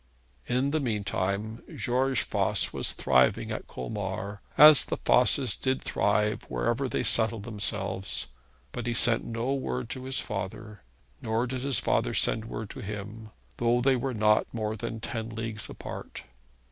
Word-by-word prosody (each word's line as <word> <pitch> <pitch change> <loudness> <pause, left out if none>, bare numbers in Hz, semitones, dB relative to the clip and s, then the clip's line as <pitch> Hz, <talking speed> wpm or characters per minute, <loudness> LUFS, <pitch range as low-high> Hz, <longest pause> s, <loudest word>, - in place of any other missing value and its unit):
In 130 +3 0
the 155 - +1
mean 110 -7 -2
time 105 +4 -3
George 130 +1 +1
Voss - - 0
was - - +4
thriving 65 -1 +2
at - - -5
Colmar, 100 - -5 0.2
as 150 -1 +9
the - - -3
Vosses 125 -1 +4
did 130 0 -2
thrive 105 +1 0
wherever 125 +3 -1
they - - -1
settled 110 -2 +4
themselves. 100 - -1 0.4
But 120 -1 -5
he 120 - -1
sent 115 -1 +5
no 115 +3 -2
word 125 -2 -3
to 130 0 -6
his 130 0 +1
father, 105 0 -6 0.4
nor 110 +2 -1
did 130 0 -4
his 135 0 +1
father - - 0
send 110 0 +2
word 110 -2 -6
to - - -9
him, 105 +1 -7 0.3
though 120 +1 +2
they 130 +2 +3
were 130 0 -3
not 105 0 +2
more 110 -1 -3
than 115 +1 -5
ten 115 -1 -4
leagues 110 -1 -4
apart. - - -8
115 Hz, 160 wpm, -27 LUFS, 105-125 Hz, 0.4 s, as